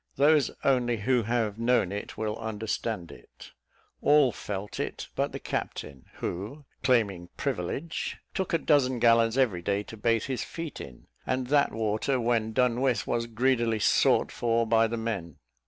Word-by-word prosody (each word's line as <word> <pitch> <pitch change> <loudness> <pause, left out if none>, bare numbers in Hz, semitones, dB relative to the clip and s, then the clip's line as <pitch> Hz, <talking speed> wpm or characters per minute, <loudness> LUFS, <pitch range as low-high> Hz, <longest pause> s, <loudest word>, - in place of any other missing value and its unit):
Those 145 +1 +4
only 125 -3 +2
who 125 +4 +2
have 115 -1 -1
known 115 -5 +2
it 100 +1 -6
will 110 -1 -2
understand 110 -4 -3
it. - - -14 0.5
All 145 -3 +5
felt 100 -1 -6
it - - -4
but - - 0
the - - -5
captain; 65 -2 -5
who, 110 - -5 0.2
claiming 100 -9 +1
privilege, 135 - -3 0.2
took 190 - -2
a 165 - +3
dozen 140 -5 +2
gallons 115 0 +4
every 115 -10 +2
day 100 +3 -1
to 110 - -10
bathe 115 0 +1
his 130 -2 -3
feet 165 -2 -6
in, 65 -3 -11 0.2
and 130 0 0
that 145 0 +3
water, 110 +4 0
when 115 -2 +1
done 125 +1 +1
with, 130 -3 +1
was 115 0 -1
greedily 120 -1 +1
sought 105 - +3
for 115 -1 +1
by 115 0 +3
the 115 +1 -3
men. 100 -9 -4
115 Hz, 160 wpm, -28 LUFS, 105-130 Hz, 0.5 s, All